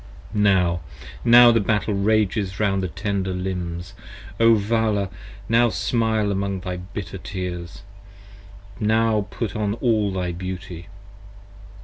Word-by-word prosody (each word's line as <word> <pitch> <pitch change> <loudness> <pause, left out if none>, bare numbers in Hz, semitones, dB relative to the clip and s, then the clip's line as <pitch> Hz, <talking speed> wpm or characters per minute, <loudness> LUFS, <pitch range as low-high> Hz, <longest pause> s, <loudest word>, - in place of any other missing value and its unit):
Now, 95 -5 +2 0.4
now 120 0 +8
the 115 - +3
battle 105 0 0
rages 100 -1 0
round 100 -2 +1
thy 95 - -1
tender 95 +1 -2
limbs, 90 -2 -4 0.5
O 115 0 +6
Vala, 105 -1 +1
30 90 - -17 0.3
Now 115 +1 +4
smile 110 -2 0
among 100 -1 -2
thy 90 0 -4
bitter 95 +1 -7
tears; 90 -2 -6 1.0
now 110 -1 +2
put 110 -3 -4
on 105 -1 -1
all 110 -5 +1
thy 90 -2 -2
beauty. 90 0 -7
100 Hz, 120 wpm, -23 LUFS, 90-110 Hz, 1.0 s, now